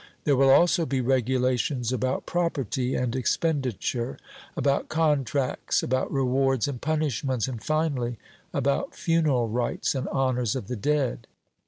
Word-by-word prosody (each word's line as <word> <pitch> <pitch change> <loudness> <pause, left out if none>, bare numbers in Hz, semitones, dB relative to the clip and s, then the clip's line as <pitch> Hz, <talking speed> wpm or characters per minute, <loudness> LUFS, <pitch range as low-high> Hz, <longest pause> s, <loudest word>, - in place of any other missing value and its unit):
There 145 - +3
will 135 +1 +4
also 170 +3 +5
be 135 - 0
regulations 130 0 +1
about 130 +1 -1
property 135 -7 -1
and 125 -1 -1
expenditure, 130 - -1 0.4
about 140 -1 +1
contracts, 145 -4 0
about 130 +1 -1
rewards 135 -2 +1
and 130 -4 -5
punishments, 140 -6 -1
and 120 -4 -6
finally 145 -7 -1 0.3
about 140 - -1
funeral 155 -8 +1
rites 120 +2 -1
and 130 - -3
honours 125 -4 0
of 130 - -4
the 125 - -4
dead. 130 -1 -1
130 Hz, 130 wpm, -26 LUFS, 125-145 Hz, 0.4 s, also